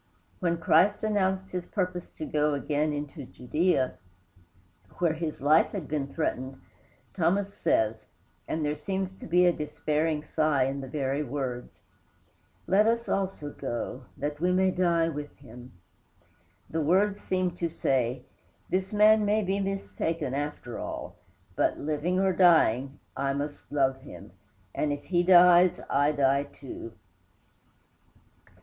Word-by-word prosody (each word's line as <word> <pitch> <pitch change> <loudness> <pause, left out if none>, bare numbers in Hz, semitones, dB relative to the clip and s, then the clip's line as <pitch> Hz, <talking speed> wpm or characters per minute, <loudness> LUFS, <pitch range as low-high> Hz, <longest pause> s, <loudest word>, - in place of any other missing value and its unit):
When 170 -3 0
Christ 170 +6 +3
announced 190 -3 0
his 180 -1 -4
purpose 180 -3 -3
to 155 - -6
go 150 -1 +1
again 150 +2 -1
into 145 0 -5
Judæa, 135 +1 0 1.0
where 170 -3 +2
his 160 -3 -5
life 155 +3 +4
had 185 -8 -4
been 145 -2 -2
threatened, 135 -3 -3 0.5
Thomas 200 +2 0
says, 110 - 0 0.4
and 155 -1 -2
there 150 - 0
seems 190 +5 -3
to - - -9
be 180 +2 +4
a 175 - +4
despairing 150 0 -1
sigh 155 -3 +1
in 135 +1 -2
the 135 - -7
very 135 +1 -1
words, 130 -3 -5 0.8
"Let 205 +3 +4
us 230 +1 +1
also 190 -7 -2
go, 125 0 -5
that 145 +1 -3
we 180 +1 +2
may 185 +1 +3
die 170 -2 +2
with 150 -2 -6
him." 125 -1 -13 1.0
The 160 - -2
words 195 +6 +2
seemed 185 -1 -2
to 170 - 0
say, 130 -5 -1 0.5
"this 190 +1 0
man 215 +1 +6
may 210 +1 +2
be 195 +1 -1
mistaken, 165 -7 -3
after 145 -4 -4
all; - - -6 0.4
but, - - +1
living 155 +5 -1
or 190 -1 +2
dying, 140 -7 +4 0.2
I 135 0 -1
must 145 +1 -5
love 135 -2 +2
him, 140 - -12 0.4
and 150 - -1
if 145 0 -4
he 175 -2 +1
dies, 180 0 +6
I 145 +2 +3
die 140 -1 +2
too." 135 -5 -10
155 Hz, 140 wpm, -28 LUFS, 140-185 Hz, 1.0 s, man